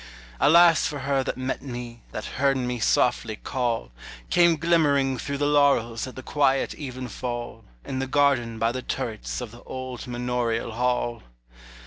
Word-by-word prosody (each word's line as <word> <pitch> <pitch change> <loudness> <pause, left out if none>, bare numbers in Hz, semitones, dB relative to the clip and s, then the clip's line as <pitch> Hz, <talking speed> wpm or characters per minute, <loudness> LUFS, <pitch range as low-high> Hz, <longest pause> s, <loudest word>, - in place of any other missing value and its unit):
Alas 170 +1 +6
for 150 - -4
her 135 -1 +1
that - - -3
met 130 +1 -3
me, 120 -3 -7
That 105 - -5
heard 135 0 +1
me 125 -1 -2
softly 110 -1 +2
call, 115 - -2 0.4
Came 170 -2 +5
glimmering 145 -5 +2
through 140 +3 -3
the 145 - 0
laurels 140 -6 +2
At 130 - -9
the 130 - -8
quiet 135 -2 +1
evenfall, 125 -3 -6 0.2
In 130 - -3
the 135 - -2
garden 130 -5 +2
by 115 +1 +1
the 130 +1 -4
turrets 115 -1 -4
Of 120 -3 -6
the 120 +1 -13
old 130 -1 -7
manorial 120 -1 -1
hall! 120 0 -1
130 Hz, 155 wpm, -25 LUFS, 120-140 Hz, 0.4 s, Alas